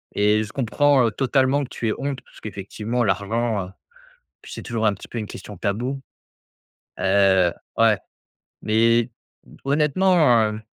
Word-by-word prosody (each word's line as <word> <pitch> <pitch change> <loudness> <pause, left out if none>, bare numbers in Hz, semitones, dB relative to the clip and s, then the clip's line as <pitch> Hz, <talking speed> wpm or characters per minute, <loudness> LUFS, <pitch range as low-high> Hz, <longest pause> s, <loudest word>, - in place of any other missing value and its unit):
Et 105 +1 +3
je 110 - -9
comprends, 135 0 +2
heu, - - -1
totalement 135 +3 +1
que 130 - -8
tu 115 - -4
aies 110 - +1
honte 140 -1 -3
parce - - -19
qu'effectivement 110 +4 -3
l'argent, 100 0 -1 0.7
puis - - -11
c'est - - -7
toujours 115 -2 -2
un 105 - +3
petit 100 - -11
peu - - -6
une 110 - -3
question 105 -1 -10
tabou. 120 +9 -2 1.0
Heu, 95 -3 +3 0.3
ouais, 115 -2 +4 0.6
mais 115 +2 +2 0.5
honnêtement, 150 -2 +3
heu, 105 +1 -7
115 Hz, 145 wpm, -22 LUFS, 105-135 Hz, 1.0 s, ouais